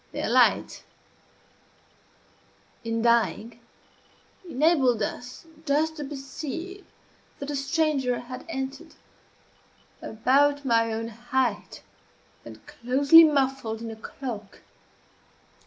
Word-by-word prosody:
Their - - -3
light, - - +2 2.0
in 230 0 -2
dying, 235 0 +1 0.9
enabled 265 -7 +2
us 245 +8 -6 0.2
just 315 +2 0
to 300 - -5
perceive 310 +7 -7 0.5
that 280 +1 -6
a - - -3
stranger 275 -3 0
had 255 +1 -9
entered, 265 -2 -6 1.1
about 280 +5 +1
my 230 -2 +2
own 225 +1 -3
height, 240 0 -2 0.6
and - - -13
closely 280 +7 +5
muffled 270 -7 0
in 230 0 -6
a - - -8
cloak. 220 -3 -8
265 Hz, 90 wpm, -26 LUFS, 230-290 Hz, 2.0 s, closely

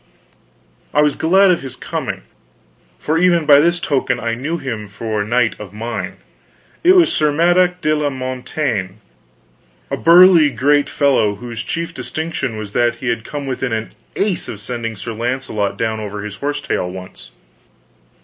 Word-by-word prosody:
I 150 - +5
was 150 -2 +2
glad 190 +4 +4
of 175 - +1
his 130 -2 -8
coming, - - -5 0.7
for 160 +2 0
even 175 -2 +3
by 145 -1 +7
this 170 +3 +2
token 135 -5 0
I 115 -1 -2
knew 140 +8 -3
him 115 -8 -5
for 105 +1 -3
knight 115 +1 +1
of 105 -2 -9
mine. 115 +3 -4 0.7
It 360 +2 +7
was 350 -3 +5
Sir 150 -1 +2
Madok 175 +3 +2
de 155 0 +2
la 150 -1 0
Montaine, 130 -6 -3 1.0
a - - -1
burly 170 -2 +7
great 140 +3 +2
fellow 130 -8 +2
whose 115 +1 -7
chief 165 +6 -4
distinction 160 -8 -4
was 105 -2 -6
that 120 +2 +1
he 125 - -4
had 115 -1 -1
come 145 +3 -6
within 130 -2 -2
an 110 0 -3 0.2
ace 200 -2 -1
of 105 - -7
sending 115 +1 -4
Sir 115 +4 -6
Launcelot 110 -4 -2
down 110 0 -1
over 105 -1 -5
his 105 -1 -7
horse 145 +1 -2
tail 90 -9 -2
once. 90 0 -10
130 Hz, 165 wpm, -18 LUFS, 110-155 Hz, 1.0 s, by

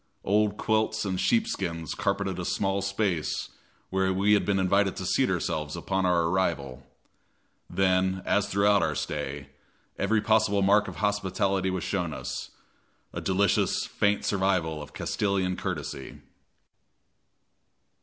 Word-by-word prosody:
Old 105 +1 +2
quilts 110 0 0
and 95 -2 -2
sheepskins 95 - 0
carpeted 100 -2 -1
a - - -3
small 95 +2 0
space 95 -4 -1 0.4
where 95 0 +1
we 100 +2 +3
had 105 - +2
been 100 -1 +2
invited 95 +1 +2
to - - -5
seat - - +2
ourselves 75 -2 -2
upon 95 -1 -1
our 85 -2 +3
arrival. 80 -7 -1 0.9
Then, 95 0 +1
as 105 0 +2
throughout 100 0 +3
our 80 -2 0
stay, 70 -1 -4 0.5
every 110 0 +2
possible 110 -2 +2
mark 105 +2 +4
of - - -7
hospitality 100 -2 0
was 95 -2 -2
shown 90 -6 -2
us - - -5 0.6
a - - -4
delicious, 100 +1 +1
faint 100 0 0
survival 90 -6 0
of 75 - -10
Castilian 95 -3 0
courtesy. 65 - -5
95 Hz, 130 wpm, -27 LUFS, 90-100 Hz, 0.9 s, mark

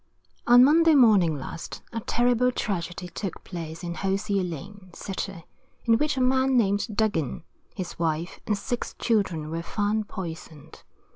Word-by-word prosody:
On 245 +1 +8
Monday 320 +3 +6
morning 200 - +5
last, 140 +4 -7
a 230 - -2
terrible 245 +2 +2
tragedy 180 -5 -3
took 180 +1 -6
place 165 -2 -7
in 170 0 -3
Hosier 195 +1 -1
lane, 185 +3 -7
City, 195 -3 -5 0.4
in 230 -1 +4
which 300 -2 0
a - - +1
man 260 +1 +3
named 205 -2 +2
Duggin, 200 - 0 0.3
his 185 -4 -6
wife, 165 +1 -2
and 210 - +1
six 240 +4 -4
children 185 -9 0
were 165 +1 -2
found 210 +3 -1
poisoned. 165 -6 -8
200 Hz, 145 wpm, -26 LUFS, 170-235 Hz, 0.4 s, On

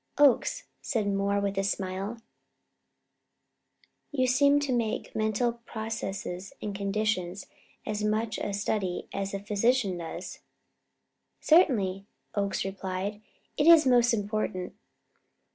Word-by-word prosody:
"Oakes," 290 - +4 0.2
said 220 -6 -1
Moore 200 0 +1
with 200 -1 -1
a - - +1
smile, 195 +3 -2 1.9
"you 260 -3 +1
seem 280 +3 +4
to 280 -3 0
make 230 -3 -2
mental 220 +2 0
processes 200 -4 -5
and 210 - -4
conditions 200 -2 -1 0.4
as 210 0 -2
much 215 +1 0
of - - -2
a - - -3
study 200 -3 -2
as 195 0 -3
the 195 - -2
physician 205 -1 +1
does." 165 - -7 1.0
"Certainly," 205 - +3 0.3
Oakes 200 -2 -1
replied. 195 +2 -4 0.4
"It 295 - +3
is 330 -3 +8
most 245 -2 +5
important. 205 -4 -2
210 Hz, 115 wpm, -28 LUFS, 195-235 Hz, 1.9 s, is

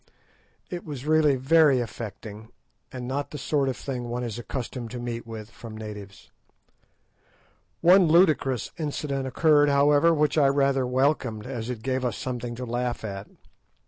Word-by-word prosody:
It 175 -1 -5
was 145 -4 -7
really 155 -2 +4
very 140 +1 +4
affecting, 110 -1 -7 0.4
and 125 -1 -6
not 140 +2 -3
the 150 - -7
sort 140 -1 0
of 130 - -3
thing 125 -3 -5
one 120 +1 -3
is 120 -1 -4
accustomed 120 -1 -5
to 125 +1 -6
meet 120 -1 -5
with 110 -1 -8
from 110 -2 -10
natives. 105 -2 -9 1.5
One 180 +1 +6
ludicrous 155 - +3
incident 140 -3 -3
occurred, 145 +2 +4
however, 145 +3 +4
which 150 -1 +2
I 140 - +5
rather 135 -2 +2
welcomed, 125 -4 0
as 125 -3 -5
it 115 -3 -5
gave 130 0 -1
us 120 -4 -1
something 120 -2 -4
to 125 +1 -5
laugh 120 0 -2
at. 100 -1 -6
130 Hz, 155 wpm, -26 LUFS, 120-145 Hz, 1.5 s, One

